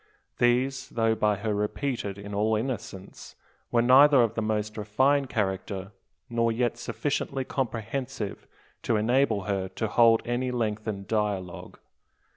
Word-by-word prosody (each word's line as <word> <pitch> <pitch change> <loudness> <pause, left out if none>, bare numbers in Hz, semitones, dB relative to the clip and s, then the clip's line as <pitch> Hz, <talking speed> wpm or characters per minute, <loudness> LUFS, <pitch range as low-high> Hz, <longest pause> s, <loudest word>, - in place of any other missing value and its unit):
These, 125 +2 +1
though 115 -1 +1
by 105 -1 +1
her 105 +2 -2
repeated 105 0 -2
in 100 0 -8
all 110 +2 +1
innocence, 110 -5 -6 0.3
were 120 -1 +2
neither 135 +1 +7
of 115 -1 0
the 115 - -2
most 110 0 -2
refined 130 +6 +1
character, 95 -1 -2 0.4
nor 115 -2 +1
yet 120 +1 -1
sufficiently 135 +1 -2
comprehensive 115 -3 -4 0.3
to 115 - 0
enable 115 -1 +2
her 95 -1 -2
to 110 - -3
hold 115 +1 +4
any 120 +2 -1
lengthened 110 -4 -3
dialogue. 105 -5 -3
110 Hz, 130 wpm, -27 LUFS, 105-125 Hz, 0.4 s, neither